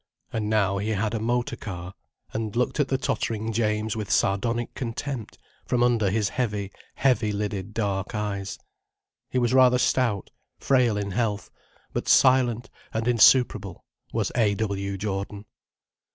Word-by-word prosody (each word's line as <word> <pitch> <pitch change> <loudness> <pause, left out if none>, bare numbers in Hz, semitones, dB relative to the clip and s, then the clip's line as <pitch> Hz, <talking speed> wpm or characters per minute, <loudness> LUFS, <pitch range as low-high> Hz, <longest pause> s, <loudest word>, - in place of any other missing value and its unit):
And 105 -2 -1
now 100 -3 +2
he 105 +2 -2
had 105 +1 0
a 115 - -1
motor 120 +2 -1
car, 90 -2 -7 0.4
and 110 -1 -3
looked 125 +5 0
at 145 - +3
the 135 - +1
tottering 115 -4 -2
James 110 -1 0
with 105 -2 -4
sardonic 115 +4 +1
contempt, 125 -1 -5 0.3
from 125 -1 +2
under 115 -5 +3
his 105 0 +1
heavy, 105 -4 -2 0.2
heavy 120 -5 +2
lidded 105 -1 -3
dark 100 -2 -2
eyes. 100 -2 -3 0.7
He - - -2
was 120 -1 +2
rather 130 -1 +6
stout, 120 -6 +1 0.3
frail 125 -5 +2
in 100 -1 -3
health, 105 0 -1 0.4
but - - -3
silent 125 -3 +4 0.2
and 110 +1 -2
insuperable, 120 -3 +4 0.3
was - - -1
A. 110 -4 +3
W. 100 -2 -2
Jordan. 100 +1 -4
110 Hz, 145 wpm, -25 LUFS, 100-120 Hz, 0.7 s, rather